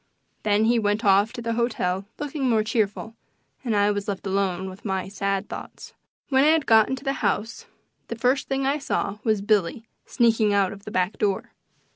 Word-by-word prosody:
Then 210 +1 +2
he 235 +1 +3
went 210 +1 0
off 200 +2 +4
to 240 -2 -7
the 230 0 -1
hotel 200 -5 -1
looking 290 -2 -2
more 220 -2 +3
cheerful, 220 0 -2 0.5
and 230 -4 -1
I 205 0 +3
was 205 0 -3
left 200 -1 -4
alone 190 -1 -1
with 190 +2 -10
my 190 -3 -2
sad 195 0 -2
thoughts. - - -9 0.4
When 265 -1 +4
I 315 +2 +5
got 225 -8 +4
into 265 0 -4
the 275 -1 0
house 215 +2 -2 0.4
the 230 - -4
first 250 +4 +1
thing 270 0 -1
I 280 +2 +1
saw 210 -7 -2
was 215 -4 +1
Billy 210 +1 +1 0.2
sneaking 225 -3 +2
out 195 -2 +2
of 200 0 -14
the 210 - -7
back 185 +1 -1
door. 200 -2 -1
215 Hz, 190 wpm, -24 LUFS, 200-235 Hz, 0.5 s, I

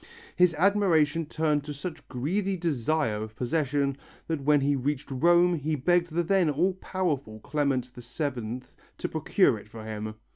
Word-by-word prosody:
His 180 -2 +4
admiration 165 -4 +3
turned 150 -2 0
to 150 -1 -6
such 155 0 -7
greedy 185 +10 -1
desire 150 -7 0
of 110 0 -7
possession 140 +1 0 0.3
that 160 -3 -2
when 145 +1 +3
he 140 +1 +2
reached 140 +1 -2
Rome 175 +6 +4
he 155 -1 -1
begged 175 +4 +2
the 170 +2 +1
then 185 -1 +3
all 170 +6 +1
powerful 155 - -3
Clement 140 -3 0
VII 125 -1 -4 0.4
to - - -2
procure - - +2
it - - -15
for 110 -1 -9
him. 110 0 -5
150 Hz, 155 wpm, -27 LUFS, 130-170 Hz, 0.4 s, His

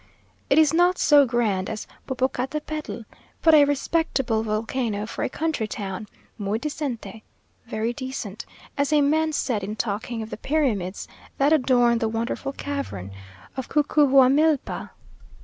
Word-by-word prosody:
It - - +4
is 315 -1 +5
not 355 +2 +4
so 290 -2 +5
grand 220 -6 0
as 215 - -5 0.2
Popocatepetl, 265 0 -3 0.4
but 320 - +6
a 295 -2 +8
respectable 280 -5 0
volcano 220 0 -2
for 220 - -6
a - - 0
country 310 -7 -2
town 205 -1 -5 0.3
_muy 205 +2 -1
decente_(very 230 -4 -5
decent), 260 -7 -6 0.3
as 280 +1 +1
a 300 -1 +5
man 315 +2 +2
said 240 -8 -1
in 210 +2 -4
talking 220 +2 -3
of 220 - -10
the - - -5
pyramids 225 - -1 0.3
that 285 +3 +4
adorn 245 -5 +3
the 225 -2 0
wonderful 230 +4 -3
cavern 275 - -5 0.4
of 265 -2 -5
Cucuhuamilpa. 290 0 +3
255 Hz, 130 wpm, -24 LUFS, 220-290 Hz, 0.4 s, a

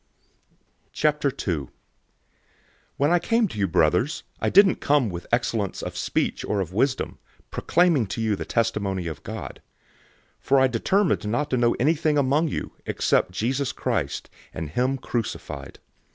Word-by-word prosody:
"{Jeremiah 150 -1 +1
9:24} 105 - -1
002:001 70 - -9 1.3
When 145 +3 +2
I 175 - +4
came 230 +4 +2
to 110 - -7
you, 100 - +2
brothers, 90 - +2 0.2
I - - +1
didn't 195 -1 +6
come 140 -7 +2
with 85 0 -7
excellence 115 -4 0
of - - -5
speech - - -1
or 105 - -1
of 90 -2 -3
wisdom, 130 +6 0 0.3
proclaiming 170 - +2
to 95 - -5
you 110 -2 +1
the - - -5
testimony 100 -5 -1
of 80 -3 -5
God. - - -7 0.8
002:002 - - -39
For 135 0 +4
I 130 - +5
determined 150 - +1
not 130 +7 -1
to 130 - +2
know 120 -1 +3
anything 150 +2 +2
among 145 +4 +2
you, - - -4 0.2
except 90 - +1
Jesus 130 +7 -1
Christ, - - -2 0.3
and 80 -2 -5
him 130 +8 +1
crucified. 120 -3 -5
125 Hz, 155 wpm, -24 LUFS, 100-145 Hz, 1.3 s, didn't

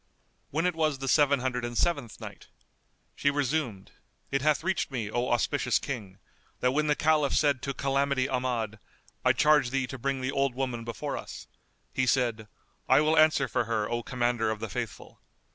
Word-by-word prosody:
When 160 +4 -1
it 180 - +2
was 155 -3 0
the 135 0 -5
Seven 140 -1 +4
Hundred 125 -1 -2
and 120 -1 -4
Seventh 145 -10 0
Night, - - -10 0.7
She 140 - +2
resumed, 140 -8 -2 0.4
It 135 - +1
hath 150 +1 +2
reached 190 +1 0
me, 115 -6 -4
O 120 +2 -1
auspicious 120 -1 +1
King, 105 -9 -6 0.4
that 125 - +2
when 150 +3 +1
the 150 - +3
Caliph 150 -2 +2
said 140 -4 +2
to 135 - -3
Calamity 140 -1 +1
Ahmad, 120 -5 -2 0.4
"I - - +5
charge 150 -4 +4
thee 135 0 0
to 130 +1 -8
bring 135 +1 -1
the 130 +1 -1
old 135 -2 0
woman 125 -3 -2
before 115 -1 -4
us," - - -9 0.5
he 130 -1 0
said, 120 -4 +1 0.4
"I - - +7
will 155 +1 +3
answer 155 -3 +4
for 120 - 0
her, 110 -2 -1
O 120 0 0
Commander 120 -2 0
of 110 -1 -2
the - - -5
Faithful!" - - -6
130 Hz, 185 wpm, -28 LUFS, 120-145 Hz, 0.7 s, I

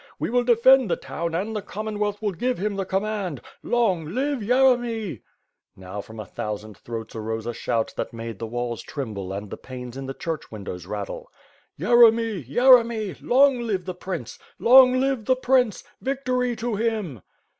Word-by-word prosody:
He - - -2
will 245 0 +3
defend 245 0 +5
the - - +2
town 170 -1 -4
and 210 +6 -2
the 210 - -2
Commonwealth 210 +1 -3
will 205 - +1
give 245 +7 -1
him 205 +2 -2
the 195 -1 -3
command 195 - -2 0.2
— - - -38
long 220 -9 +1
live 280 +1 0
Yeremy!" 240 - +2 0.5
Now, 95 +2 -7
from 110 +2 -12
a 110 - -5
thousand 105 +1 -6
throats 115 +2 -7
arose 110 0 -4
a 120 - -3
shout 115 0 -1
that - - -3
made 115 -2 -7
the 115 - -4
walls 120 0 -3
tremble 105 -10 -5
and 100 +1 -6
the - - -5
panes 125 -1 -9
in 135 0 -6
the 135 - -5
church 165 -2 -5
windows 95 -5 -7
rattle. 100 -1 -5 0.5
"Yeremy! 225 0 +4
Yeremy! 235 - +4
Long 270 0 +4
live 205 -7 -2
the 185 - -4
Prince! 180 -9 -6 0.2
Long 255 +1 +7
live 265 -4 0
the 255 - +3
Prince! 255 -4 +2 0.2
Victory 255 -2 -1
to 225 -1 -2
him!" 210 - -2
205 Hz, 175 wpm, -24 LUFS, -, 0.5 s, Long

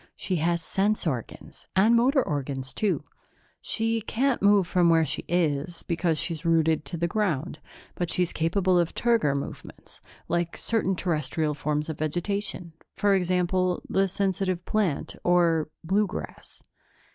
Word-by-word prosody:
She 185 - -1
has 170 +1 0
sense 205 +4 0
organs, 130 -8 -5
and 215 +5 +5
motor 260 +3 +4
organs, 140 -4 -3
too. 210 -2 0 0.6
She 225 0 0
can't 260 +4 0
move 200 -2 +5
from 175 0 +3
where 165 -1 +4
she 145 +1 -2
is, 165 -1 -1
because 165 -1 0
she's 165 0 -2
rooted 160 -2 +2
to 155 +5 -5
the 170 +1 0
ground, 175 -6 -1 0.3
but 175 -2 -3
she's 180 0 0
capable 180 +3 +2
of 170 -1 -1
turgor 230 -12 +2
movements, 140 - -8 0.3
like 170 0 -1
certain 215 -4 0
Terrestrial 155 -3 -1
forms 150 +1 -2
of 160 -2 -5
vegetation 175 +2 -2 0.2
for 205 -1 +2
example, 180 0 +1
the 195 0 +2
sensitive 185 -2 -1
plant 200 -9 -1
or 170 -3 +3
blue 200 +5 +2
grass." - - -9
175 Hz, 145 wpm, -26 LUFS, 160-195 Hz, 0.6 s, and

